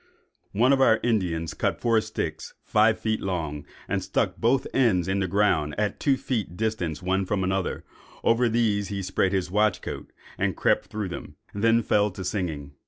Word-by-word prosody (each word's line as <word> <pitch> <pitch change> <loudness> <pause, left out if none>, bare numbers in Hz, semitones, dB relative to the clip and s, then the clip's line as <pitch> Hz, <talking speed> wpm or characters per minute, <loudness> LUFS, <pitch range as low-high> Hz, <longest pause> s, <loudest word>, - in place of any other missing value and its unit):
"One 125 +6 +4
of 135 - +2
our 110 -4 +5
Indians 90 -9 0
cut - - -1
four 115 -2 +3
sticks, 110 0 -5
five 110 +1 +3
feet 110 -1 -1
long, 80 -6 -3 0.2
and - - -1
stuck - - -1
both 125 +3 +2
ends 100 -10 +2
in 95 +1 0
the 95 - 0
ground, 85 -7 +1
at 105 -1 -1
two 140 -2 +2
feet 110 -10 -3
distance 95 -9 -2
one 95 +1 +1
from 95 0 -1
another; 95 0 -1 0.4
over 115 +1 +3
these 110 -3 +1
he 100 -1 -4
spread 95 0 +1
his 95 -2 -1
watch 105 +1 +2
coat, - - -6 0.3
and - - 0
crept - - +2
through 105 -3 -4
them, 90 - -8 0.2
and 100 - -4
then 115 0 +4
fell 105 0 +2
to 95 0 -7
singing. 80 -8 -3
100 Hz, 185 wpm, -26 LUFS, 90-110 Hz, 0.4 s, our